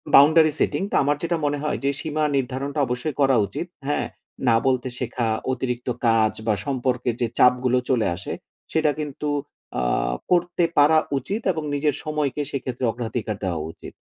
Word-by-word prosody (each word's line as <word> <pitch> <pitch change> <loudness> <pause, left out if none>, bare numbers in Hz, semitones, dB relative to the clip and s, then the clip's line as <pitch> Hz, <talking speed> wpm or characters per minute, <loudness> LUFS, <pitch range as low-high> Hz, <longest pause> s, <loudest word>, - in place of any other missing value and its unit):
boundary 155 +2 +7
setting 195 - +1
তো - - 0
আমার 145 +1 +2
যেটা 170 0 0
মনে 145 0 +1
হয় 150 - 0
যে 140 - +2
সীমা 155 0 -2
নির্ধারণটা 135 +3 -2
অবশ্যই 125 +4 -2
করা 135 -2 +5
উচিৎ। 170 - -5 0.2
হ্যাঁ? 145 - 0 0.4
'না' 115 -1 +5
বলতে 130 -1 +1
শেখা, 120 -1 -1 0.3
অতিরিক্ত 125 -1 -3 0.2
কাজ, 110 -1 +4
বা 110 - +4
সম্পর্কের 125 -3 -1
যে 120 - +2
চাপগুলো 125 0 +4
চলে 120 -6 +2
আসে, 95 - -5 0.4
সেটা 155 -2 +3
কিন্তু 150 0 -3 0.5
আ - - 0 0.5
করতে 175 0 +2
পারা 150 +2 +6 0.2
উচিৎ, 200 - -3
এবং 160 -3 -4
নিজের 145 -1 +1
সময়কে 150 -3 -1
সেক্ষেত্রে 130 -2 -3
অগ্রাধিকার 115 -2 -3
দেওয়া 85 -5 -1
উচিৎ। - - -12
135 Hz, 160 wpm, -23 LUFS, 125-150 Hz, 0.5 s, boundary